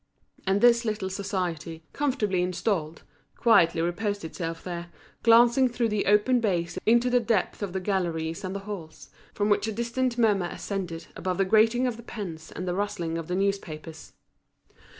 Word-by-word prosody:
And 195 Hz, +1 st, +2 dB
this 240 Hz, 0 st, +5 dB
little 210 Hz, -4 st, -2 dB
society, 180 Hz, -5 st, -3 dB
comfortably 220 Hz, -10 st, 0 dB
installed, 180 Hz, -3 st, -2 dB, 0.3 s
quietly 170 Hz, -8 st, +4 dB
reposed 200 Hz, +2 st, -2 dB
itself 165 Hz, 0 st, -5 dB
there, 175 Hz, -1 st, -5 dB, 0.3 s
glancing 240 Hz, +2 st, +5 dB
through 240 Hz, -1 st, 0 dB
the 210 Hz, -1 st, -1 dB
open 210 Hz, +5 st, +4 dB
bays 180 Hz, -7 st, -1 dB
into 240 Hz, +2 st, +4 dB
the 245 Hz, -, +5 dB
depths 225 Hz, -5 st, 0 dB
of 200 Hz, -3 st, -3 dB
the 190 Hz, -, -2 dB
galleries 170 Hz, -4 st, -2 dB
and 190 Hz, +1 st, -4 dB
the 200 Hz, -, -4 dB
halls, 195 Hz, -6 st, -8 dB, 0.2 s
from 205 Hz, -, +1 dB
which 210 Hz, +1 st, +2 dB
a -, -, -1 dB
distant 235 Hz, +3 st, -1 dB
murmur 205 Hz, -6 st, +3 dB
ascended 175 Hz, -4 st, -5 dB
above 185 Hz, 0 st, -2 dB
the 195 Hz, -, +2 dB
grating 225 Hz, +5 st, +4 dB
of 245 Hz, -3 st, -1 dB
the -, -, -9 dB
pens 170 Hz, -9 st, -7 dB
and 180 Hz, -, -6 dB
the 180 Hz, -, 0 dB
rustling 175 Hz, -4 st, -2 dB
of 165 Hz, -, -7 dB
the 180 Hz, -, -2 dB
newspapers. 175 Hz, -5 st, -3 dB
195 Hz, 170 wpm, -27 LUFS, 175-225 Hz, 0.3 s, this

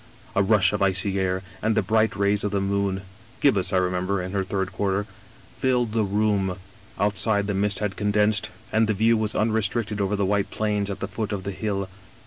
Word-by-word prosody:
A 100 Hz, -, +4 dB
rush 100 Hz, -1 st, +4 dB
of -, -, -1 dB
icy 95 Hz, 0 st, +1 dB
air, 95 Hz, 0 st, 0 dB, 0.2 s
and 110 Hz, 0 st, +1 dB
the 110 Hz, -, +2 dB
bright 110 Hz, +3 st, +2 dB
rays 100 Hz, 0 st, +1 dB
of 105 Hz, -, 0 dB
the 100 Hz, 0 st, 0 dB
moon 100 Hz, -1 st, -1 dB, 0.2 s
— -, -, -25 dB
^gibbous, 105 Hz, -10 st, +3 dB
I 95 Hz, -, +2 dB
remember, 90 Hz, +1 st, 0 dB
in 90 Hz, 0 st, -4 dB
her 100 Hz, -1 st, 0 dB
third 95 Hz, 0 st, -2 dB
quarter 100 Hz, +1 st, -1 dB, 0.3 s
— -, -, -24 dB
^filled 125 Hz, -3 st, +2 dB
the 110 Hz, 0 st, +1 dB
room. 100 Hz, -2 st, +1 dB, 0.4 s
Outside 105 Hz, 0 st, +1 dB
the 100 Hz, -, -1 dB
mist 100 Hz, +1 st, 0 dB
had 105 Hz, -2 st, -2 dB
condensed, 105 Hz, +1 st, +1 dB, 0.2 s
and 110 Hz, 0 st, +3 dB
the 110 Hz, -, +1 dB
view 115 Hz, +3 st, +4 dB
was^ 110 Hz, -1 st, -1 dB
unrestricted 110 Hz, -1 st, 0 dB
over 100 Hz, +1 st, 0 dB
the 100 Hz, -1 st, 0 dB
white 100 Hz, 0 st, +1 dB
plains 105 Hz, -2 st, -1 dB
at 100 Hz, -1 st, -5 dB
the -, -, -2 dB
foot 110 Hz, -2 st, -4 dB
of 100 Hz, -2 st, -3 dB
the 100 Hz, -, -3 dB
hill. 100 Hz, -1 st, -2 dB
100 Hz, 215 wpm, -24 LUFS, 95-105 Hz, 0.4 s, A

